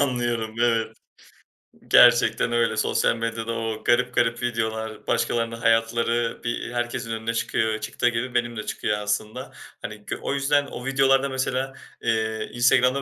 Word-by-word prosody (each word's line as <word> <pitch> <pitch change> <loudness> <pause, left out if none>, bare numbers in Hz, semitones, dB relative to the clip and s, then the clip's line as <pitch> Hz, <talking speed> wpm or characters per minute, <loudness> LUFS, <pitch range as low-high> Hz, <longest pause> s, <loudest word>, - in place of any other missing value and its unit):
Anlıyorum, 120 -5 -1
evet. 115 -2 +1 0.9
Gerçekten - - +5
öyle. 115 -2 +1
Sosyal 110 - +1
medyada 115 0 -3
o 115 -1 -4
garip 125 +1 +2
garip 115 0 +1
videolar, 110 -2 -3
başkalarının 115 -1 0
hayatları 115 +1 +1
bir 120 0 -3
herkesin 120 -1 -3
önüne 115 0 -3
çıkıyor, 110 -1 -1
çıktığı 120 +2 0
gibi 120 +2 -3
benim 120 -1 -1
de 110 - -5
çıkıyor 105 -1 -2
aslında. 105 +1 -3 0.3
Hani, 105 -1 -8
gö - - -3
o - - -2
yüzden 140 +1 +2
o 125 - -8
videolarda 135 0 +3
mesela, 130 0 -2 0.3
eee, 110 -1 -1
Instagram'da 125 +2 +3
115 Hz, 145 wpm, -24 LUFS, 110-125 Hz, 0.9 s, Gerçekten